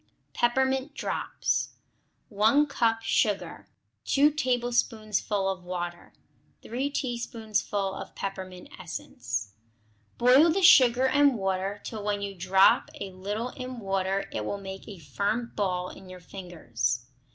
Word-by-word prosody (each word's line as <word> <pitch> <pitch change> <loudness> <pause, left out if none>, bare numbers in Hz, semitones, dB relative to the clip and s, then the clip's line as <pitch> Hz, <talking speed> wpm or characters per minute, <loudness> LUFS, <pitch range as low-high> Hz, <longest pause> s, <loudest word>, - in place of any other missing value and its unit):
Peppermint 265 +3 +1
Drops - - -2 0.5
1 220 +7 +4
cup 230 -5 0
sugar. 210 -3 0 0.4
2 290 +2 +4
tablespoonfuls 240 -6 0 0.3
of - - -20
water. 175 -1 -5 0.5
3 260 +5 -2
teaspoonfuls 220 -6 -2
of - - -10
peppermint 185 -2 -6
essence. 115 - -5 0.6
Boil 260 +7 +6
the 380 +4 +1
sugar 255 -5 +7
and 280 -1 +4
water 195 0 -2
till 215 -3 -6
when 205 -1 -1
you 200 0 -4
drop 190 +1 +4
a 195 - -5
little 205 +6 -4
in 255 0 -7
water 195 -2 -1
it 105 - -3
will 200 - -3
make 195 -1 -8
a 205 -3 -8
firm 200 - -2
ball 180 -3 -1
in 190 - -13
your 185 0 -9
fingers. 120 - -3
205 Hz, 125 wpm, -27 LUFS, 185-245 Hz, 0.6 s, sugar